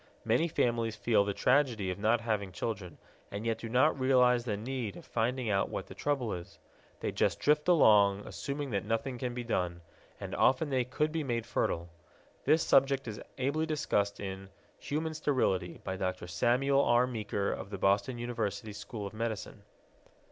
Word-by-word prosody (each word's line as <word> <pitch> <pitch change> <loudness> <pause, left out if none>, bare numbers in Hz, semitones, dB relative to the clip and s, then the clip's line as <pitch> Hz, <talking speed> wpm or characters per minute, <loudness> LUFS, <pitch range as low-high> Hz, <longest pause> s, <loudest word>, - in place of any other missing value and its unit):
Many 120 +9 +3
families 115 -7 0
feel 110 -1 +3
the 100 - -1
tragedy 125 -8 +2
of 90 - -6
not 110 +3 +2
having 105 -4 -1
children, 90 -2 -4 0.3
and 105 +2 -5
yet 115 -1 0
do 115 - -6
not 130 +5 +3
realize 125 -2 +4
the 105 -4 -1
need 120 -1 -4
of - - -12
finding 120 +2 -1
out 100 -2 +1
what - - -4
the - - -10
trouble 135 -6 -1
is. 85 -1 -8 0.4
They - - -1
just - - +1
drift 150 +2 +2
along, 105 - +5
assuming 140 -1 -4
that 100 -2 -1
nothing 115 +3 -2
can 125 -1 -3
be 125 - -3
done, 90 -7 -1 0.4
and - - -6
often 140 +3 +2
they 130 -2 +1
could 150 +5 -1
be 160 -1 -1
made 120 -4 -2
fertile. 85 -6 -1 0.6
This 155 +3 +4
subject 135 -1 +3
is 105 -2 -6 0.2
ably 140 +5 0
discussed 105 -10 0
in 95 -1 -6 0.3
Human 160 +2 -2
Sterility 115 - 0
by 95 - -3
Dr. 95 -2 -3
Samuel 125 +10 +2
R. 120 +1 +4
Meaker 105 -5 -2
of - - -5
the 100 - -5
Boston 100 +6 +1
University 115 -2 -3
School 105 +1 -6
of 100 - -7
Medicine. 110 -1 -4
115 Hz, 175 wpm, -31 LUFS, 100-130 Hz, 0.6 s, along